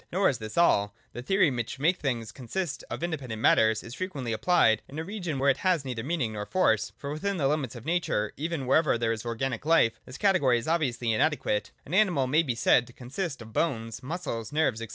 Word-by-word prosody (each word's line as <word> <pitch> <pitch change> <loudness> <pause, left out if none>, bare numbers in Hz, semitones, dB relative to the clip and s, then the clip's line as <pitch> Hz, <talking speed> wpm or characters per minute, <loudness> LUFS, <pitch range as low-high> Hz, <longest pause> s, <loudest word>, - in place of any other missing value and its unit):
Nor 190 +3 +3
is 125 - -2
this 110 +4 -7
all. 105 -12 +3 0.2
The 120 - -6
theory, 185 +2 +3
which 120 0 -4
makes 165 +7 +2
things 120 -6 -2
consist 150 +6 -4
of - - -5
independent 140 -10 -3
matters, 110 -1 +4
is 115 - -9
frequently 140 -9 -4
apphed 115 - +3
in 145 - -9
a 160 - -2
region 180 -5 -4
where 140 +1 +4
it 135 - -2
has 175 -5 +1
neither 125 -3 -3
meaning 135 -6 -1
nor 105 -1 -5
force. 145 - +2
For 140 - -6
within 195 +6 -2
the 140 -4 +1
limits 140 -4 -1
of 120 +1 -10
nature 160 -11 0
even, 155 -1 -3
wherever 150 0 +3
there 115 -1 0
is 115 +1 -4
organic 120 +1 -2
life, 145 -8 +3
this 130 - -9
category 180 -12 +3
is 115 - -5
obviously 130 -8 0
inadequate. 110 -5 0 0.2
An 155 - -8
animal 185 -9 +3
may 150 +6 +3
be 130 -8 -2
said 120 +1 +3
to 120 - -15
consist 135 +2 -5
of 110 0 -14
bones, 115 -7 -1
muscles, 130 - -4
nerves, 150 -7 +1
&c. 115 - -5
135 Hz, 220 wpm, -28 LUFS, 115-165 Hz, 0.2 s, matters